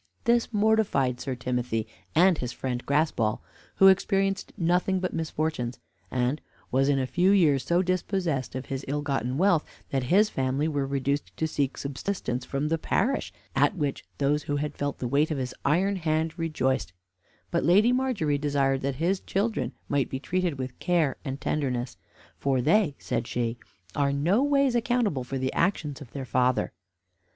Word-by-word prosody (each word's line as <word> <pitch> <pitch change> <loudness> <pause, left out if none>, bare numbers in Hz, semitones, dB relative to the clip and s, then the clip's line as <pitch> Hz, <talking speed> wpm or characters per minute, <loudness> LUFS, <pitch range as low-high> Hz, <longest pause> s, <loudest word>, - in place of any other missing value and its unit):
This 235 0 +2
mortified 205 - +2
Sir 130 -2 -3
Timothy 125 -3 -2 0.3
and 175 0 +5
his 125 -1 -3
friend 125 -1 -3
Graspall, 140 -7 +1 0.4
who 195 - +7
experienced 195 +1 +2
nothing 180 +1 +2
but 185 0 -2
misfortunes, 155 -6 -2 0.3
and 125 +3 0 0.3
was 135 +2 +3
in 140 - +3
a 130 - +1
few 175 +9 +2
years 155 -10 +4
so 170 +6 +2
dispossessed 180 -7 -1
of 130 - -4
his 135 0 -4
ill 145 +2 -1
gotten 135 -3 -1
wealth, 180 -2 +3 0.3
that 135 -2 0
his 200 +10 +4
family 135 +3 0
were 145 -3 -1
reduced 140 +1 -2
to 160 - 0
seek 140 -3 -1
subsistance 140 -3 -3
from 140 +2 -2
the 165 0 0
parish, 270 - 0 0.2
at - - +3
which 145 -6 -2
those 145 +1 +1
who 145 - -2
had 145 0 -2
felt 145 0 -2
the 125 - -3
weight 145 +5 +2
of 155 - -1
his 130 -2 -3
iron 190 +7 +2
hand 160 -1 0
rejoiced; 135 - -1 0.6
but 170 - +1
Lady 205 +8 +5
Margery 240 - +1
desired 140 -2 +1
that 140 0 -1
his 175 +7 0
children 195 - -1 0.2
might 145 -1 0
be 130 - -3
treated 175 +1 -1
with 130 -1 -6
care 170 -6 +1
and 135 -1 -4
tenderness; 130 -4 -2 0.4
"for 135 -2 +1
they" 155 - +3
(says - - -3
she) 120 -1 -1 0.4
"are 140 -1 +2
noways 255 - +2
accountable 235 - +1
for 135 +2 -4
the 130 0 -1
actions 160 -5 0
of 135 - -10
their 135 -2 -5
father." 125 +1 +1
145 Hz, 170 wpm, -27 LUFS, 130-180 Hz, 0.6 s, who